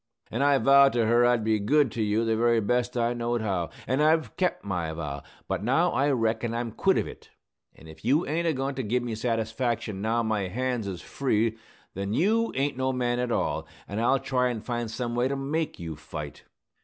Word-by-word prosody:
An' 115 Hz, -, -1 dB
I 140 Hz, 0 st, +4 dB
vowed 140 Hz, 0 st, +6 dB
to 120 Hz, -2 st, +2 dB
her 120 Hz, +2 st, +4 dB
I'd 120 Hz, -2 st, +2 dB
be 110 Hz, 0 st, +2 dB
good 135 Hz, +5 st, +3 dB
to 115 Hz, -, -3 dB
you 110 Hz, +2 st, +1 dB
the 115 Hz, 0 st, +1 dB
very 115 Hz, +1 st, +3 dB
best 125 Hz, +3 st, 0 dB
I 120 Hz, 0 st, +1 dB
knowed 120 Hz, -1 st, -1 dB
how. 95 Hz, -6 st, -1 dB, 0.2 s
An' 130 Hz, +4 st, 0 dB
I've 155 Hz, +1 st, +2 dB
kep' 180 Hz, -1 st, 0 dB
my 90 Hz, -5 st, -2 dB
vow. 75 Hz, -3 st, -5 dB, 0.3 s
But -, -, -2 dB
now 150 Hz, +10 st, +2 dB
I 140 Hz, +2 st, +2 dB
reckon 115 Hz, -2 st, 0 dB
I'm 115 Hz, -1 st, -2 dB
quit -, -, +2 dB
of -, -, +1 dB
it; -, -, -12 dB, 0.5 s
an' 80 Hz, -, -15 dB
if 80 Hz, 0 st, -13 dB
you 140 Hz, +9 st, +2 dB
ain't 170 Hz, +3 st, -1 dB
a 160 Hz, -, +2 dB
goin' 135 Hz, +1 st, -2 dB
to 135 Hz, -, -3 dB
give 120 Hz, +2 st, 0 dB
me 120 Hz, -2 st, -3 dB
satisfaction 115 Hz, -2 st, -2 dB
now 115 Hz, +2 st, +1 dB
my 105 Hz, -3 st, 0 dB
hands 125 Hz, +1 st, -2 dB
is 95 Hz, -3 st, -6 dB
free, 115 Hz, -4 st, 0 dB, 0.4 s
then 100 Hz, +2 st, -3 dB
you 225 Hz, +6 st, +2 dB
ain't 140 Hz, 0 st, 0 dB
no 130 Hz, 0 st, 0 dB
man 125 Hz, -1 st, 0 dB
at 125 Hz, -1 st, -1 dB
all, -, -, -1 dB, 0.2 s
an' 100 Hz, +3 st, -4 dB
I'll 120 Hz, +4 st, +3 dB
try 125 Hz, -1 st, 0 dB
an' 115 Hz, -3 st, -3 dB
find 120 Hz, -1 st, -3 dB
some 120 Hz, +1 st, -3 dB
way 120 Hz, +1 st, +1 dB
to 140 Hz, -, -2 dB
make 150 Hz, +4 st, -2 dB
you 80 Hz, -2 st, -5 dB
fight!" 75 Hz, -1 st, -8 dB
120 Hz, 220 wpm, -27 LUFS, 110-130 Hz, 0.5 s, vowed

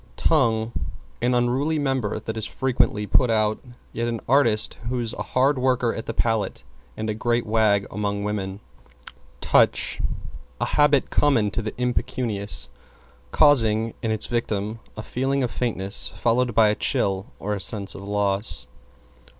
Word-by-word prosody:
=TONGUE= 115 Hz, -7 st, +2 dB, 0.5 s
An 125 Hz, +1 st, +2 dB
unruly 130 Hz, +6 st, +1 dB
member 135 Hz, -7 st, -1 dB
that 110 Hz, -, -5 dB
is 110 Hz, -1 st, -2 dB
frequently 125 Hz, -5 st, 0 dB
put 120 Hz, +5 st, +3 dB
out, 110 Hz, -1 st, +1 dB, 0.3 s
yet 115 Hz, +1 st, -2 dB
an 115 Hz, -1 st, -2 dB
artist 115 Hz, -5 st, +2 dB
who's 120 Hz, -2 st, -1 dB
a -, -, -5 dB
hard 135 Hz, +2 st, +1 dB
worker 125 Hz, -2 st, +1 dB
at 115 Hz, -, -6 dB
the 115 Hz, -, -2 dB
palate 110 Hz, -, 0 dB, 0.3 s
and 110 Hz, -, -3 dB
a 110 Hz, -, 0 dB
great 120 Hz, +2 st, 0 dB
wag 105 Hz, -2 st, +2 dB
among 100 Hz, 0 st, -2 dB
women. 100 Hz, -1 st, -3 dB, 0.8 s
=TOUCH= -, -, +3 dB, 0.6 s
A -, -, +1 dB
habit 145 Hz, -2 st, +3 dB
common 120 Hz, -8 st, +3 dB
to 120 Hz, -, -2 dB
the 110 Hz, -1 st, -6 dB
impecunious, 125 Hz, -4 st, -2 dB, 0.6 s
causing 115 Hz, -, +4 dB
in 115 Hz, -, -1 dB
its 110 Hz, -1 st, 0 dB
victim 110 Hz, -2 st, -2 dB, 0.2 s
a 110 Hz, -, -5 dB
feeling 135 Hz, +3 st, -1 dB
of 120 Hz, -, -1 dB
faintness, 100 Hz, -5 st, -2 dB
followed 120 Hz, 0 st, 0 dB
by 110 Hz, -2 st, +6 dB
a 105 Hz, -, +1 dB
chill 95 Hz, -1 st, 0 dB
or 105 Hz, +2 st, -3 dB
a 100 Hz, -, -3 dB
sense 100 Hz, -1 st, -1 dB
of -, -, -9 dB
loss. 100 Hz, -, -1 dB
115 Hz, 150 wpm, -24 LUFS, 105-125 Hz, 0.8 s, by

